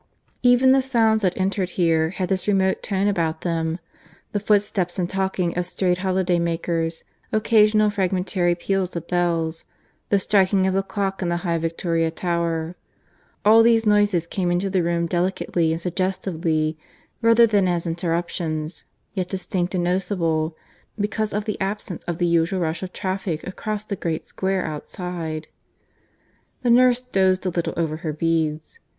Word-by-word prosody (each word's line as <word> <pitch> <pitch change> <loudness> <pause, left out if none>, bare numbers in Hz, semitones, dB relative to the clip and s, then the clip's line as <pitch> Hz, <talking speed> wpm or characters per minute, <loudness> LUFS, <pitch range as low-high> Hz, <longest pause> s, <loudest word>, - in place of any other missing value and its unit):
Even 250 +1 +5
the 270 0 +5
sounds 225 -4 +2
that 185 -3 0
entered 190 -1 0
here 165 -3 +3
had 185 +1 -3
this 185 +1 -1
remote 190 -2 +2
tone 195 0 0
about 165 -5 0
them; 165 -1 -1 0.5
the 205 - -1
footsteps 200 -3 +1
and 180 -2 0
talking 190 -2 -1
of 180 0 -1
strayed 180 -1 0
holiday 185 -2 +1
makers, 165 -1 -2 0.3
occasional 215 -1 +4
fragmentary 185 -2 0
peals 190 +1 -2
of 170 0 -5
bells, 170 -2 0 0.5
the 200 - +4
striking 195 -1 +3
of 190 - +1
the 195 - +2
clock 195 -1 -3
in 175 - -1
the 175 - 0
high 170 -1 +1
Victoria 165 0 0
Tower 170 0 -2 0.7
all 220 +2 +7
these 225 -1 +4
noises 205 -5 +3
came 180 +1 -2
into 180 +3 0
the 185 -1 +2
room 170 0 0
delicately 175 -1 0
and 165 - -1
suggestively 170 -3 -1 0.4
rather 230 0 +6
than 205 -4 +2
as 175 -1 0
interruptions, 165 -2 -2 0.3
yet 185 -4 -2
distinct 185 -1 -2
and 175 - 0
noticeable 170 -3 0 0.4
because 210 +1 -1
of 210 +1 -2
the 210 -2 -4
absence 195 -2 -3
of 170 -2 -3
the 175 - +1
usual 170 +2 +1
rush 160 0 -1
of 185 -1 -5
traffic 185 -4 -3
across 210 +3 -4
the 205 - -3
great 165 -3 -3
square 190 -1 -1
outside. 160 0 -5 1.2
The 240 - +3
nurse 250 +1 +5
dozed 190 -5 +1
a - - +2
little 170 -1 -2
over 160 -2 -1
her 160 -2 -4
beads. 160 - -1
180 Hz, 155 wpm, -23 LUFS, 170-200 Hz, 1.2 s, all